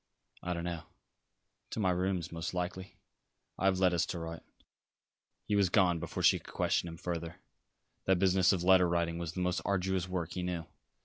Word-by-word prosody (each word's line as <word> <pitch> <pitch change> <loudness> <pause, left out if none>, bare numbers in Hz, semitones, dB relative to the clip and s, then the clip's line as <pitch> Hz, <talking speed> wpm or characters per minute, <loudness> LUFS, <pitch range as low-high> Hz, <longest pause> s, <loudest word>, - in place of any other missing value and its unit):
"I 90 - -2
don't 85 - -4
know. 85 -2 -3 0.9
To - - -4
my 95 -4 +3
rooms, 90 -1 -1
most 85 +2 -4
likely. 95 +2 -4 0.6
I - - 0
have 95 -1 +4
letters 90 -3 +3
to 90 - -4
write." 80 0 -6 1.0
He 105 - 0
was 100 -3 +4
gone 90 -2 +3
before 85 0 -4
she - - +5
could - - -13
question 85 - +1
him 80 - -8
further. 85 -2 -4 0.7
That 95 -1 +4
business 95 0 +4
of 90 -3 0
letter 90 -1 +6
writing 85 -1 0
was 85 -1 -4
the 90 - -3
most 90 0 0
arduous 95 -2 0
work 90 -3 -2
he 90 - -3
knew. 90 -2 -3
90 Hz, 185 wpm, -32 LUFS, 85-95 Hz, 1.0 s, letter